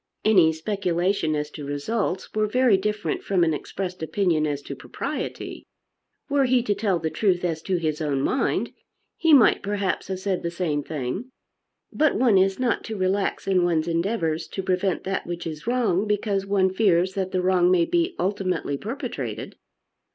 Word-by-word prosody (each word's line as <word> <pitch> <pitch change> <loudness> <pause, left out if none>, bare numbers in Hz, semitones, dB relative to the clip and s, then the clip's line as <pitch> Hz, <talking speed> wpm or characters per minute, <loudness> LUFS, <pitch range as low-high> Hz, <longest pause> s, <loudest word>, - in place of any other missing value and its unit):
Any 185 -7 +6
speculation 175 -1 0
as 150 0 -3
to 150 - -8
results 180 +7 -2
were 215 0 +1
very 250 0 +4
different 210 +2 -2
from 185 -3 +1
an 160 -2 +2
expressed 180 +4 -5
opinion 160 -1 +1
as 145 -1 -3
to - - -6
propriety. - - -5 0.6
Were 280 -1 +2
he 250 -1 +3
to 210 - +1
tell 200 -2 0
the 160 -1 -3
truth 185 -4 +1
as 160 -2 -2
to 185 +3 -1
his 155 -2 -2
own 140 -3 0
mind, 265 - 0 0.4
he 325 -1 +2
might 270 -6 +6
perhaps 200 -1 -2
have 190 -1 -3
said 190 -1 -1
the 170 - -2
same 170 -4 -1
thing. 150 - -4 0.6
But 310 -1 +2
one 230 -6 +4
is 190 0 +2
not 255 -2 0
to 220 -2 -5
relax 190 +1 0
in 185 -2 +2
one's 170 -2 +1
endeavours 165 -2 -1
to 190 - -5
prevent 185 0 0
that 195 0 -3
which 175 0 -5
is 155 +3 -6
wrong, 215 -6 +1
because 205 -1 0
one 190 -2 +2
fears 190 -3 +2
that 190 -1 -2
the 185 -1 0
wrong 180 -1 +3
may 180 -2 +4
be 345 +1 0
ultimately 185 -6 -1
perpetrated. 230 - -5
185 Hz, 175 wpm, -24 LUFS, 165-205 Hz, 0.6 s, Any